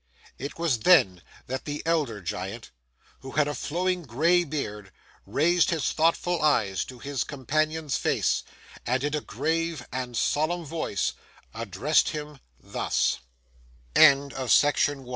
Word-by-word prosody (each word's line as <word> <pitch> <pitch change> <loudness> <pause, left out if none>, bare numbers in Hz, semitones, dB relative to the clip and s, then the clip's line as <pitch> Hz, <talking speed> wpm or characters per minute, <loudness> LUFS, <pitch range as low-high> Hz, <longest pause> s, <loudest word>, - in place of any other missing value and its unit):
It 140 +2 -6
was 165 -8 +1
then 100 - +5 0.2
that 130 +1 -5
the 145 0 -4
elder 150 -11 0
Giant, 95 +6 -5 0.5
who 135 - -10
had 150 -1 +2
a 145 - -2
flowing 180 +5 -1
gray 165 +6 +2
beard, 105 - -5 0.4
raised 170 +4 +3
his 160 -5 0
thoughtful 165 +2 +1
eyes 110 -11 +2
to 130 - -11
his 140 0 -3
companion's 155 +2 -1
face, - - +1 0.4
and 125 +2 0
in 145 +1 0
a 150 - -2
grave 165 -3 -2
and 125 -2 -4
solemn 165 +3 0
voice 155 - -2 0.4
addressed 115 - +1
him 150 -2 -6 0.2
thus: - - -1 0.7
FIRST - - -29
NIGHT 140 -2 +6
OF 130 -2 -4
THE 145 -1 +1
GI - - -12
145 Hz, 145 wpm, -26 LUFS, 125-160 Hz, 0.7 s, NIGHT